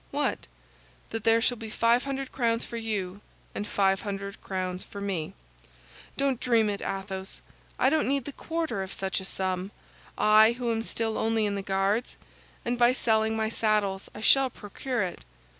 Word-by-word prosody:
"What?" - - -1 0.6
"That 225 -1 -4
there 225 0 +6
shall 245 +1 +1
be 220 -1 -7
five 230 +3 +3
hundred 275 -1 -3
crowns 230 -3 0
for 235 - -8
you, 205 -4 -3 0.3
and 205 - -4
five 195 -1 +2
hundred 200 -1 -5
crowns 185 -1 -3
for 200 - -9
me." 190 -6 -3 0.8
"Don't 275 -3 +1
dream 225 -4 +3
it, 200 - -4
Athos. 195 0 -4 0.4
I 265 - +4
don't 315 0 +2
need 275 -2 0
the 285 - -5
quarter 320 -8 -3
of 190 0 -5
such 190 0 -1
a 190 - -6
sum—I 195 +4 +2
who 240 -1 -2
am 225 0 0
still 225 -1 -2
only 225 -1 +2
in 205 - 0
the 200 - -2
Guards—and 200 +4 -2
by 240 +1 +6
selling 220 -3 +2
my 220 0 0
saddles, 210 -4 0
I - - -7
shall 270 +3 +6
procure 235 +2 -3
it. 180 -2 -5
220 Hz, 170 wpm, -28 LUFS, 195-240 Hz, 0.8 s, there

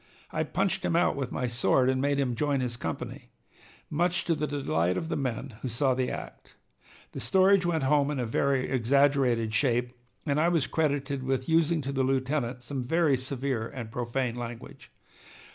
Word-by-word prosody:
I 155 - -1
punched 190 +4 -1
him 165 - 0
out 175 +1 +3
with 135 -3 -3
my 125 - -2
sword 120 +2 +2
and 130 0 +1
made 140 0 +1
him 130 -3 0
join 140 +2 0
his 125 -2 -2
company, 115 - -6 0.6
much 175 +3 0
to 170 - +2
the 150 -1 -2
delight 90 - 0
of 165 - -3
the - - -1
men 130 -2 -3
who - - -3
saw 130 +3 +1
the 130 0 -1
act. - - -8 0.6
The - - -6
story 190 +1 +4
went 165 -4 0
home 145 +1 +3
in 150 - -2
a 125 - 0
very 130 +3 +1
exaggerated 130 -3 +2
shape, 125 +1 +1 0.3
and 145 -1 +1
I 165 +2 +3
was 165 -6 +2
credited 140 -3 -1
with 130 0 -1
using 165 -1 +2
to 135 - -3
the 135 -1 0
lieutenant 130 -1 -1
some 130 0 -4
very 160 +2 +2
severe 130 -2 -2
and 115 -4 -7
profane 120 +1 -2
language. 120 -1 -8
135 Hz, 185 wpm, -28 LUFS, 125-150 Hz, 0.6 s, story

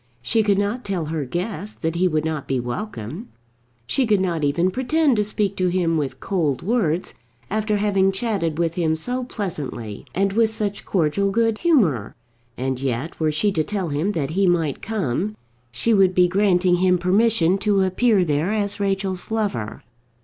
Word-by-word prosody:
She 225 - +2
could 205 -2 +2
not 205 +5 -1
tell 185 -5 -2
her 155 -3 -2
guest 190 - -4
that 160 0 0
he 180 +2 +2
would 155 -2 0
not 155 -3 -3
be 135 -1 0
welcome. 125 - -5 0.6
She 255 - +1
could 210 -2 +3
not 170 -4 -1
even 170 +6 +2
pretend 275 - +2
to 210 - +3
speak 205 -1 -1
to 185 - +1
him 175 -2 +1
with 145 -4 -2
cold 160 -9 -1
words 185 -5 0 0.4
after 215 0 0
having 195 -2 +2
chatted 195 -6 -1
with 165 -1 0
him 165 -2 +1
so 250 +10 -3
pleasantly, 145 - -5
and 195 +1 +1
with 225 +1 +3
such 210 -2 -3
cordial 190 +2 +1
good 225 +1 +1
humour; 185 - +2 0.4
and 130 0 -2
yet, 135 +4 -3
were 155 -1 +2
she 200 +7 +1
to 160 -5 0
tell 190 0 -3
him 155 +8 -1
that 150 -4 -2
he 195 +3 +2
might 165 -5 +1
come, 200 - -2 0.4
she 175 - +1
would 190 -3 +4
be 180 -1 +5
granting 180 -1 +3
him 180 0 +3
permission 190 0 +3
to 205 -2 +2
appear 190 +1 +2
there 155 +4 0
as 205 -2 -1
Rachel's 195 -2 -1
lover. 205 - -2
185 Hz, 180 wpm, -22 LUFS, 160-210 Hz, 0.6 s, be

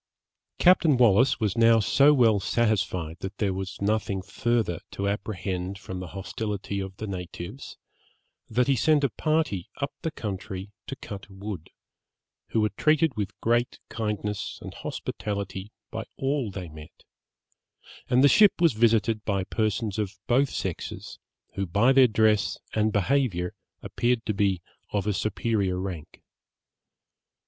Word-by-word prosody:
Captain 170 -6 +5
Wallis 120 +2 +4
was 105 -4 0
now 115 0 +6
so 140 +7 +5
well 115 -7 +4
satisfied 95 -7 0
that 95 +2 -6
there 100 -3 0
was 95 0 -5
nothing 100 -2 0
further 110 -3 0
to 100 - -3
apprehend 95 -2 -3
from 95 -1 -7
the 90 - -6
hostility 100 0 -3
of 95 0 -6
the 110 - -4
natives, 90 +4 -7 0.7
that 125 +3 +2
he 135 - +4
sent 150 +4 +3
a 135 - +2
party 155 - 0
up 140 -1 -3
the 160 - -1
country 100 -5 -6 0.2
to 135 - -4
cut 105 -5 -9
wood, 95 -3 -7 0.8
who 110 - +1
were 105 - +2
treated 155 -1 +3
with 105 -3 -4
great 120 +1 +1
kindness 105 -2 -3
and - - -7
hospitality 100 -1 -5 0.2
by 115 - -4
all 135 -3 0
they 95 -2 -6
met, 75 -1 -13 1.1
and 125 +2 +4
the - - +9
ship 210 +7 +7
was 170 -5 +4
visited 110 -1 +2
by 100 -2 0
persons 110 +1 -1
of 100 -1 -3
both 135 +3 +3
sexes, 95 -4 -5 0.3
who 95 0 -2
by 105 +9 +4
their 130 -1 +7
dress 110 -2 +2 0.2
and 110 0 +2
behaviour 100 -4 +1 0.3
appeared 120 -1 0
to 105 - 0
be 95 -3 +1 0.3
of 100 -2 -1
a 105 - +1
superior 105 -2 0
rank. 90 -5 -6
105 Hz, 145 wpm, -26 LUFS, 95-120 Hz, 1.1 s, the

